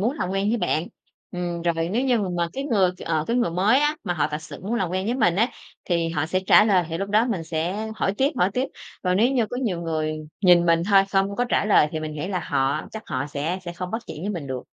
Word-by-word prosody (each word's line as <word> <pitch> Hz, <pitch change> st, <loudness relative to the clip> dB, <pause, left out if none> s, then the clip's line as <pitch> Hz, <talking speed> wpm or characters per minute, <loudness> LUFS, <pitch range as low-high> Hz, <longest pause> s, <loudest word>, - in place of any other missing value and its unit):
muốn 230 Hz, +6 st, +1 dB
làm 180 Hz, -, -1 dB
quen 195 Hz, +1 st, 0 dB
với 235 Hz, +2 st, +1 dB
bạn." 160 Hz, -5 st, 0 dB, 0.5 s
Ừm, 175 Hz, -1 st, -3 dB
rồi 165 Hz, -1 st, 0 dB
nếu 230 Hz, +7 st, 0 dB
như 250 Hz, -3 st, +3 dB
mà 200 Hz, -3 st, -1 dB
mà 170 Hz, -1 st, 0 dB
cái 270 Hz, +1 st, -4 dB
người, 200 Hz, -9 st, +3 dB
ờ, 160 Hz, -2 st, 0 dB
cái 235 Hz, -, 0 dB
người 240 Hz, -8 st, +1 dB
mới 200 Hz, +10 st, +3 dB
á, 295 Hz, +1 st, +1 dB
mà 175 Hz, -, -1 dB
họ 150 Hz, -1 st, +1 dB
thật 150 Hz, +1 st, -4 dB
sự -, -, -10 dB
muốn 215 Hz, +5 st, -2 dB
làm 190 Hz, -7 st, -1 dB
quen 185 Hz, +1 st, -1 dB
với 240 Hz, -, 0 dB
mình 180 Hz, -9 st, +2 dB
á, 225 Hz, +5 st, +3 dB, 0.4 s
thì 170 Hz, -2 st, 0 dB
họ 160 Hz, -2 st, -1 dB
sẽ 185 Hz, +3 st, 0 dB
trả 210 Hz, -, +7 dB
lời 190 Hz, -5 st, +3 dB
thì 165 Hz, -, -3 dB
lúc 195 Hz, +1 st, -3 dB
đó 215 Hz, +3 st, +3 dB
mình 195 Hz, -9 st, -2 dB
sẽ 175 Hz, +7 st, -2 dB
hỏi 195 Hz, -, 0 dB
tiếp, 275 Hz, +2 st, +3 dB
hỏi 185 Hz, -, +3 dB
tiếp. 255 Hz, +2 st, 0 dB, 0.4 s
Còn 180 Hz, -1 st, +1 dB
nếu 235 Hz, +6 st, +3 dB
như 240 Hz, -4 st, +2 dB
có 245 Hz, -, -5 dB
nhiều 215 Hz, -10 st, -1 dB
người 155 Hz, -2 st, -1 dB, 0.3 s
nhìn 175 Hz, -3 st, +5 dB
mình 165 Hz, 0 st, +3 dB
thôi, 195 Hz, -1 st, +7 dB
không 195 Hz, +1 st, +1 dB
có 245 Hz, -, +1 dB
trả 240 Hz, -, +1 dB
lời 205 Hz, -7 st, +5 dB
thì 155 Hz, -, -3 dB
mình 155 Hz, 0 st, -4 dB
nghĩ 150 Hz, +4 st, -4 dB
là 185 Hz, -2 st, -1 dB
họ 140 Hz, 0 st, 0 dB
chắc 220 Hz, -, -6 dB
họ 130 Hz, +2 st, -2 dB
sẽ 150 Hz, +5 st, -3 dB
sẽ 175 Hz, -, -5 dB
không 180 Hz, +1 st, -6 dB
bắt 225 Hz, +3 st, -3 dB
chuyện -, -, -7 dB
với 200 Hz, -, -2 dB
mình 170 Hz, -8 st, -5 dB
được. 130 Hz, -2 st, -4 dB
185 Hz, 285 wpm, -24 LUFS, 165-215 Hz, 0.5 s, trả